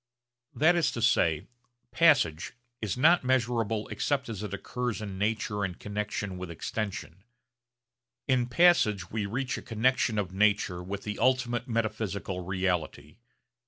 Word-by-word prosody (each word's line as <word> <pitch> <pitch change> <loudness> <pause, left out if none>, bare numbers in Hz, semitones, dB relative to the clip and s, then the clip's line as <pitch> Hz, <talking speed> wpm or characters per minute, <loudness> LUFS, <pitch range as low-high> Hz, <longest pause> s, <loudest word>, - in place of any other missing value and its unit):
That 160 +4 +4
is 170 - +2
to 115 - -4
say, 80 -10 +2 0.5
'passage' 125 - +3 0.3
is 110 0 -2
not 165 +5 +5
measurable 115 -4 0
except 140 -3 -1
as 105 -4 -5
it 105 -3 -5
occurs 120 +4 -3
in 100 -3 -6
nature 105 0 -1
in 90 -2 -2
connexion 105 -2 -4
with 90 -1 -6
extension. 95 +1 -5 1.0
In 130 -3 +2
passage 120 - +3
we 105 -2 -2
reach 125 +5 -2
a - - -10
connexion 120 -1 +1
of 95 -3 -2
nature 100 -3 +2
with 100 +2 -6
the 105 -1 -5
ultimate 120 0 +1
metaphysical 110 -5 -2
reality. 90 -2 -2
105 Hz, 135 wpm, -28 LUFS, 95-125 Hz, 1.0 s, not